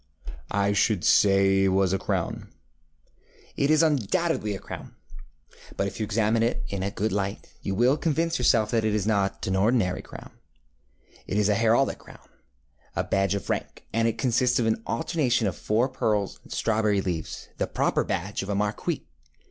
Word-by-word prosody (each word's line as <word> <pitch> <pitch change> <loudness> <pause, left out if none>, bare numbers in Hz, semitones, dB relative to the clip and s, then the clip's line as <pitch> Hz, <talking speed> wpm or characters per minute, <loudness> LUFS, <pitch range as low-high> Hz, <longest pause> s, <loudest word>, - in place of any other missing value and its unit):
ŌĆØ 100 0 +1
ŌĆ£I - - -1
should 100 -4 +2
say 95 -1 +4
it - - +4
was 95 0 +2
a 95 - 0
crown. - - -3 1.1
ŌĆØ - - +1
ŌĆ£It - - -5
is 155 +1 +5
undoubtedly 150 - 0
a - - -7
crown; - - -9 0.8
but 95 - +1
if 100 - -5
you - - 0
examine 110 +1 +1
it 115 +1 0
in 100 -1 -3
a 95 - -1
good 105 +2 -2
light, 100 +1 -3
you 95 - -3
will 125 +7 +3
convince 165 0 0
yourself 110 -3 +3
that 115 -2 +1
it 110 -1 +1
is 105 -3 0
not 100 -3 0
an 95 - -1
ordinary 100 -2 +2
crown. - - -11 1.0
It 100 - -2
is 105 -1 +2
a 105 - +3
heraldic 115 +4 +2
crownŌĆöa - - -11
badge 95 0 +2
of 100 - -3
rank, - - -4
and 115 0 +2
it 115 - -1
consists 125 -1 +2
of 120 - +1
an 110 0 0
alternation 125 -2 0
of 95 -5 -1
four 110 - +1
pearls 105 -6 -1
and - - -18
strawberry 110 -2 +1
leaves, 85 -5 -5
the - - 0
proper - - 0
badge 95 +4 -3
of 95 - -6
a 100 - 0
marquis. 105 +1 -2
105 Hz, 185 wpm, -26 LUFS, 100-115 Hz, 1.1 s, is